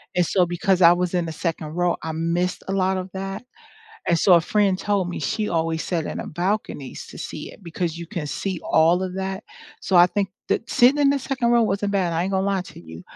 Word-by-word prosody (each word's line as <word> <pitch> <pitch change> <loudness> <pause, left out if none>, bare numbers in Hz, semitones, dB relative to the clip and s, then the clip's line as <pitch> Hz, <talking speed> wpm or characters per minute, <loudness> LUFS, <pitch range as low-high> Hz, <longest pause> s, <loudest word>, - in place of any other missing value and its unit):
and 180 - +3
so 180 +1 +2
because 180 +2 +1
I 170 - +9
was 180 0 -1
in 175 -1 +1
the - - -4
second 160 -1 -3
row 175 -1 +1
I 160 - -3
missed 170 +3 -1
a - - -2
lot 190 0 +1
of 185 0 -5
that 195 +3 -5 0.6
and 170 - +3
so 185 - +6
a 170 - +6
friend 195 +1 +1
told 200 -3 0
me 180 - -4
she 210 +9 -1
always 165 -1 -1
sat 165 -4 -2
in - - -4
a - - -7
balcony 175 -6 -3
to - - -11
see - - -6
it - - -17
because 170 0 -3
you 170 - -7
can 170 -6 -5
see 185 +4 -3
all 170 +3 +3
of 185 -1 -4
that 190 +1 -3 0.4
so 190 - +1
I 175 +1 +8
think 195 0 -2 0.2
that 225 - -1
sitting 255 +5 +5
in 280 -1 +4
the 280 - +1
second 260 -2 -1
row 235 -1 +5
wasn't 200 -1 -1
bad 180 -4 +1
I 165 - 0
ain't 195 - -2
gonna 190 +1 +1
lie 195 -2 0
to - - -13
you 80 0 -11
180 Hz, 245 wpm, -23 LUFS, 170-195 Hz, 0.6 s, I